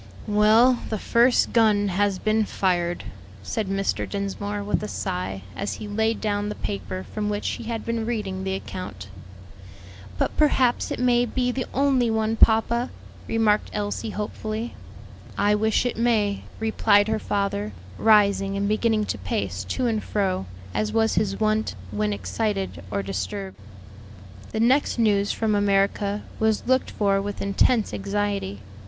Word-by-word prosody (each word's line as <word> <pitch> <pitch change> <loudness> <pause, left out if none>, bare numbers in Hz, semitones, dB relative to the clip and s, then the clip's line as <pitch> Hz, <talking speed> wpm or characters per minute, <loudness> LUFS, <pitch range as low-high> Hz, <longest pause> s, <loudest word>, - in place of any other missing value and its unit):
"Well, 220 +4 +5
the 220 - -1
first 235 +4 +3
gun 210 -3 +4
has 200 +1 +1
been 215 +2 +1
fired," 175 -3 0 0.4
said 215 - -2
Mr. 195 0 -1
Dinsmore, 200 +1 -3
with 205 - 0
a 210 - -3
sigh, 95 - -4
as 200 - -3
he 215 - -7
laid 220 +2 0
down 205 -1 -1
the 210 - -4
paper 95 -2 -5
from 210 -1 -1
which 205 0 -2
he - - -5
had 230 -1 -4
been 230 -1 -2
reading 200 -5 -3
the 190 0 -1
account. 100 - -7 1.1
"But - - -1
perhaps 260 -5 +3
it - - -3
may 245 -1 +3
be 250 +1 0
the 255 0 -3
only 265 -3 +2
one, 220 0 +1
papa," 230 +2 +3 0.4
remarked 215 -2 +2
Elsie 205 +1 -2
hopefully. 215 +2 -4 0.6
"I 205 +1 +3
wish 220 +3 +2
it 245 - -1
may," 220 -4 +1
replied 220 -2 +3
her 220 0 0
father, 200 - -1 0.3
rising 200 -2 +4
and 200 0 0
beginning 215 0 +1
to 105 - -3
pace 95 0 -2
to 250 - -2
and 220 -3 0
fro, 190 - -1 0.3
as 215 0 -1
was 225 0 +2
his 195 -1 0
wont 215 - +1 0.2
when 105 0 0
excited 190 - -2
or 100 0 -2
disturbed. 95 0 -4 0.9
The 220 - -2
next 255 +5 +3
news 205 -3 +2
from 220 -1 0
America 200 0 +1 0.2
was 220 -1 +1
looked 260 +1 +2
for 200 -2 +1
with 205 0 -5
intense 205 +3 +2
anxiety. 200 - -2
210 Hz, 150 wpm, -24 LUFS, 195-225 Hz, 1.1 s, Well